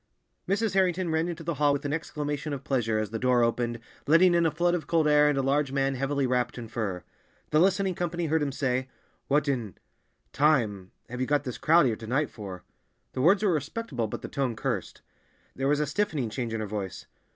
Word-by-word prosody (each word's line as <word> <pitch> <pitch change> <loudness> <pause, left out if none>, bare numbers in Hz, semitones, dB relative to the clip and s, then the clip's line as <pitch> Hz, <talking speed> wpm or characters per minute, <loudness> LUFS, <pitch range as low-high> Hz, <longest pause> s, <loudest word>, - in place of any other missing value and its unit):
Mrs. 205 +1 +1
Harrington 185 -2 +1
ran 160 +1 +1
into 170 -1 -5
the 170 +1 -2
hall 145 -1 +2
with 140 0 -3
an 145 - -1
exclamation 150 -2 -3
of 140 -1 -5
pleasure, 115 -6 0
as 110 -1 -2
the 115 - -3
door 125 -1 +3
opened, 120 0 0 0.3
letting 170 +4 +6
in 170 -1 +3
a - - +3
flood 175 +3 +1
of 175 -3 -2
cold 160 -2 +2
air 150 0 +5
and 145 - 0
a 135 - +1
large 140 +1 +1
man 135 0 +1
heavily 135 +1 -1
wrapped 125 -1 0
in 120 -2 -6
fur. 105 -6 -3 0.5
The 155 - +4
listening 190 +1 +2
company 175 0 -2
heard 160 0 +1
him 145 -1 0
say, 130 -1 -1 0.4
"What 145 +2 +2
in—time—have 120 - -2
you 130 - 0
got 145 -1 +2
this 125 -4 -6
crowd 165 0 +5
here 115 -4 +1
to 110 - -9
night 135 +4 0
for?" 95 -5 -8 0.5
The 130 - -2
words 195 +8 +4
were 195 -4 +3
respectable, 145 - -3
but - - -6
the - - -4
tone 135 -5 -2
cursed. 120 -6 -4 0.5
There 135 +1 -1
was 145 +1 +2
a 150 - +1
stiffening 145 - -1
change 120 -1 -3
in 115 -1 -2
her - - -2
voice. 100 -3 -5
140 Hz, 215 wpm, -27 LUFS, 120-160 Hz, 0.5 s, letting